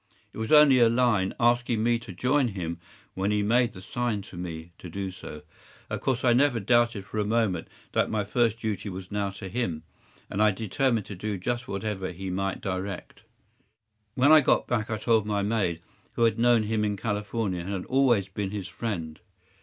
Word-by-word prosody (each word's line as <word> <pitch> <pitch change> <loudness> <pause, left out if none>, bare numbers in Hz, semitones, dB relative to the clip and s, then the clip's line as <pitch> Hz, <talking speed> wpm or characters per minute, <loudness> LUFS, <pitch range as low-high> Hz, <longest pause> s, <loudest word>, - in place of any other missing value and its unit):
It - - -8
was 110 - -3
only 150 -4 +7
a 120 -1 +6
line 115 -5 +2
asking 120 -1 +2
me 120 0 +2
to 115 - -10
join 125 +8 +1
him 85 -5 -4 0.3
when 95 +1 -1
he 105 0 +1
made 120 +2 +2
the 95 - -11
sign 120 -2 -2
to - - -13
me 85 -1 -6
to 90 - -9
do 95 +2 -4
so. 75 -4 -10 0.5
Of - - -3
course 130 -2 0
I 120 - +5
never 130 -1 +3
doubted 120 -1 +2
for 110 - -4
a - - +2
moment 105 -5 0 0.2
that - - +1
my 110 -1 0
first 115 +2 +1
duty 110 -2 -3
was 95 0 -8
now 100 -1 -1
to 95 0 -8
him, 90 -7 -2 0.4
and 100 - -2
I 110 - +6
determined 110 +3 0
to 100 - -7
do 105 +2 -3
just 120 +6 -3
whatever 100 -2 -3
he 95 +1 -6
might 95 +1 -2
direct. 95 0 -5 0.9
“When 135 +4 +5
I 155 -1 +9
got - - +2
back 110 -3 -1
I 110 - -1
told 110 -1 +2
my 100 -1 0
maid, 100 -6 0 0.3
who 115 - +1
had 115 -1 +2
known 120 -1 +4
him 110 0 0
in 105 -1 -1
California, 105 -2 -2
and 90 - -6
had 95 -2 -3
always 125 -7 +3
been 100 0 -4
his 100 -2 -5
friend. 85 -6 -4
105 Hz, 200 wpm, -27 LUFS, 95-120 Hz, 0.9 s, I